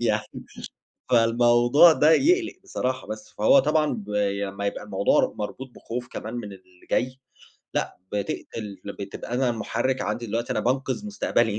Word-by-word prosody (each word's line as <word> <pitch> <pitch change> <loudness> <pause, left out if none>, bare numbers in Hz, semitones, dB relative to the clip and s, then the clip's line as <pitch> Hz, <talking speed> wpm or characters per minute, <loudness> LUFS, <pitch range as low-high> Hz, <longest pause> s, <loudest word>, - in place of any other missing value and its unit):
يعني 110 -3 -1 0.7
فالموضوع 120 +6 +6
ده 155 0 +4
يقلِق 345 - +3
بصراحة. 130 - -3
بس، 110 0 -7
فهو 110 +6 +6
طبعًا 150 +2 +2
بي 100 -1 -1
أمّا 100 +1 -4
يبقى - - -3
الموضوع - - +2
مربوط 125 +5 -5
بخوف 120 +1 -6
كمان 110 +2 -6
من 110 -4 -5
اللي 95 -2 -17
جاي، 130 +1 0 0.6
لأ، - - -2
بتقتل 105 0 -4
ل 100 - -5
بتبقى 100 +4 -6
أنا 125 0 +2
مُحرِّك 120 +3 -1
عندي 120 - -3
دلوقتي 115 +2 -2
أنا - - 0
بانقِذ 130 - -1
مستقبلي، 120 - 0
120 Hz, 150 wpm, -25 LUFS, 105-130 Hz, 0.7 s, فالموضوع